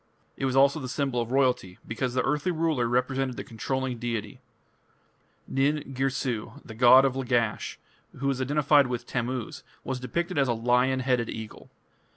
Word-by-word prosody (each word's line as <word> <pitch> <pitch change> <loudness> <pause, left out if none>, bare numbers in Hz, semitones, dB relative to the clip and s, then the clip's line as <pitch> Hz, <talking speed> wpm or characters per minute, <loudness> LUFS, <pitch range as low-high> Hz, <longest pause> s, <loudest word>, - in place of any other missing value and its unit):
It 135 - -3
was 130 -1 0
also 140 +3 +4
the 130 -3 -6
symbol 130 -2 -1
of 115 0 -5
royalty, 125 -9 +1
because 120 +2 -3
the 130 - +2
earthly 150 +5 0
ruler 160 -7 0
represented 125 +1 0
the - - -4
controlling 130 +1 -3
deity. 115 -3 -4 1.1
Nin 140 +1 0
Girsu, 130 -4 -2
the 110 - -9
god 125 +3 +7
of 130 -1 0
Lagash, 120 -4 -1 0.4
who 135 - -5
was 135 -1 0
identified 145 +1 +3
with 120 -1 -4
Tammuz, 125 -1 -3 0.2
was 130 0 -3
depicted 170 +7 -2
as 135 - +3
a 120 - +2
lion 125 +3 +2
headed 125 -3 0
eagle. 110 -1 -8
130 Hz, 165 wpm, -27 LUFS, 120-135 Hz, 1.1 s, god